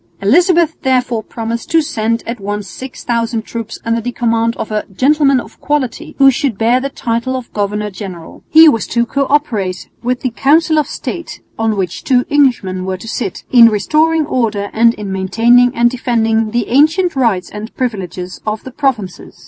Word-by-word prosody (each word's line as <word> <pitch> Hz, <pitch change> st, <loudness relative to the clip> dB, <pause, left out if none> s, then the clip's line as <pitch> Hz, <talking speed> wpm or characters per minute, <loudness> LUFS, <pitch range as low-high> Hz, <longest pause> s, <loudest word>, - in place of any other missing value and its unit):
Elizabeth 340 Hz, -, +3 dB
therefore 250 Hz, -3 st, 0 dB
promised 230 Hz, +1 st, -5 dB
to 330 Hz, -, +4 dB
send 230 Hz, -6 st, -1 dB
at 235 Hz, 0 st, -5 dB
once 205 Hz, +1 st, -4 dB
6000 235 Hz, -3 st, -3 dB
troops 230 Hz, -1 st, -6 dB
under 230 Hz, 0 st, 0 dB
the 245 Hz, +2 st, -3 dB
command 230 Hz, -1 st, 0 dB
of 220 Hz, -, -5 dB
a 210 Hz, 0 st, -1 dB
"gentleman 275 Hz, +5 st, +3 dB
of -, -, -11 dB
quality," 290 Hz, -4 st, -2 dB
who 275 Hz, -1 st, +6 dB
should 270 Hz, -5 st, -2 dB
bear 235 Hz, +3 st, +2 dB
the 275 Hz, -, -3 dB
title 235 Hz, 0 st, -2 dB
of 255 Hz, -2 st, -7 dB
governor 210 Hz, 0 st, -2 dB
general. 185 Hz, -4 st, -9 dB
He 320 Hz, +1 st, +8 dB
was 230 Hz, -8 st, +2 dB
to 235 Hz, 0 st, 0 dB
co 275 Hz, +3 st, -1 dB
operate 210 Hz, -11 st, -1 dB
with 250 Hz, +1 st, -2 dB
the 255 Hz, -, -1 dB
Council 310 Hz, +6 st, +3 dB
of 295 Hz, -, -1 dB
State 340 Hz, +2 st, -6 dB, 0.2 s
(on 220 Hz, -2 st, 0 dB
which 185 Hz, -2 st, -3 dB
two 250 Hz, -2 st, +2 dB
Englishmen 240 Hz, -11 st, +1 dB
were 190 Hz, 0 st, -3 dB
to 205 Hz, -, -11 dB
sit) 220 Hz, -4 st, -4 dB
in 235 Hz, -2 st, +8 dB
restoring 310 Hz, +9 st, +1 dB
order 215 Hz, -7 st, -1 dB
and 230 Hz, +1 st, +3 dB
in 205 Hz, -2 st, -6 dB
maintaining 235 Hz, +6 st, +3 dB
and 235 Hz, 0 st, +3 dB
defending 225 Hz, -3 st, 0 dB
the 235 Hz, 0 st, -2 dB
ancient 315 Hz, +7 st, +3 dB
rights 225 Hz, -9 st, 0 dB
and 215 Hz, +2 st, -8 dB
privileges 185 Hz, -7 st, -4 dB
of 215 Hz, 0 st, -3 dB
the 260 Hz, -, -9 dB
provinces. 240 Hz, -9 st, -3 dB
235 Hz, 180 wpm, -15 LUFS, 215-265 Hz, 0.2 s, He